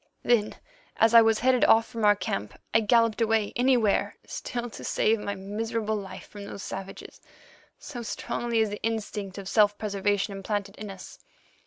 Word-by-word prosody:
Then, 225 -3 +2 0.4
as 225 +1 +4
I 230 - +10
was 225 -1 +3
headed 255 +1 +3
off 225 -5 +5
from 230 -2 -3
our 205 0 +6
camp, 105 - -4
I - - +6
galloped 230 0 +3
away 220 -2 +1
anywhere, 245 -4 +2
still 240 -1 -5
to - - -9
save 220 +1 +1
my 200 -1 -4
miserable 215 +3 -3
life 195 -2 -7
from 205 -1 -10
those 200 - -8
savages, 195 0 -8 0.6
so 245 -4 -8
strongly 235 0 -2
is 215 -2 0
the 205 - -6
instinct 210 -3 -3
of 195 -1 -7
self 205 0 +3
preservation 205 -1 -1
implanted 200 0 -3
in 210 -1 -7
us. 195 -1 -10
215 Hz, 170 wpm, -27 LUFS, 200-230 Hz, 0.6 s, I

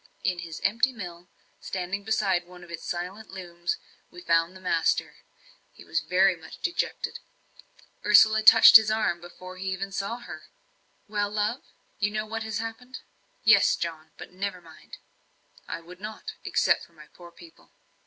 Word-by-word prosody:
In 180 -1 0
his 165 -3 -7
empty 230 +6 +2
mill, 180 -6 -9 0.3
standing 190 +2 -4
beside 195 -5 0
one 180 0 -13
of 170 - -13
its 170 - -7
silenced 185 +5 -5
looms, 175 -2 -4 0.3
we 175 - -12
found 165 +2 +2
the - - -11
master. 165 -3 0 0.5
He - - -16
was 165 - 0
very 185 +5 +3
much 160 -1 -12
dejected 350 - -3 0.8
Ursula 215 +1 +6
touched 225 +1 +10
his 220 -1 -1
arm 215 -6 0
before 185 +1 -11
he 190 +1 -6
even 195 +1 -4
saw 200 +4 -3
her. 245 - -10 0.6
"Well, 205 -1 -1
love 210 +4 -1 0.4
you 205 +1 +2
know 215 +1 -3
what 225 +1 -5
has 220 -2 -3
happened?" 225 +3 -7 0.4
"Yes, - - +6
John. 160 -2 -5
But - - -10
never 185 0 -4
mind." 165 -2 -14 0.7
"I - - -5
would 180 +2 -13
not 220 - -7
except - - +2
for 170 - -17
my 155 -2 -15
poor 175 -1 -13
people." 330 - -17
190 Hz, 165 wpm, -26 LUFS, 175-215 Hz, 0.8 s, touched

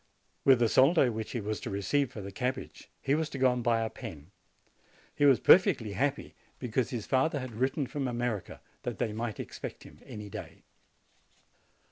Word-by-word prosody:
With 135 -2 +7
the 120 -1 +3
soldo 135 +2 +5
which 110 -1 -5
he 120 - -1
was 105 0 -3
to - - -5
receive 110 +8 0
for 105 - -7
the 100 0 -7
cabbage 125 +5 -4
he 135 - +2
was 155 +1 0
to 140 - -6
go 130 -1 +4
and 125 -1 -3
buy 115 -1 +2
a 110 - -1
pen. 90 - -9 0.8
He 145 - +2
was 135 -3 +6
perfectly 120 - +5
happy 140 +6 -1 0.2
because 125 0 -1
his 120 -5 -3
92 - - -13
JANUARY 130 0 +4
father 155 -2 0
had 125 -4 -7
written 135 +2 +1
from 135 +2 -3
America 120 -4 -3 0.2
that - - -4
they 110 - -1
might 110 -2 -4
ex - - -7
pect - - -7
him - - -15
any 105 -1 -7
day. 100 - -9
125 Hz, 200 wpm, -30 LUFS, 110-135 Hz, 0.8 s, With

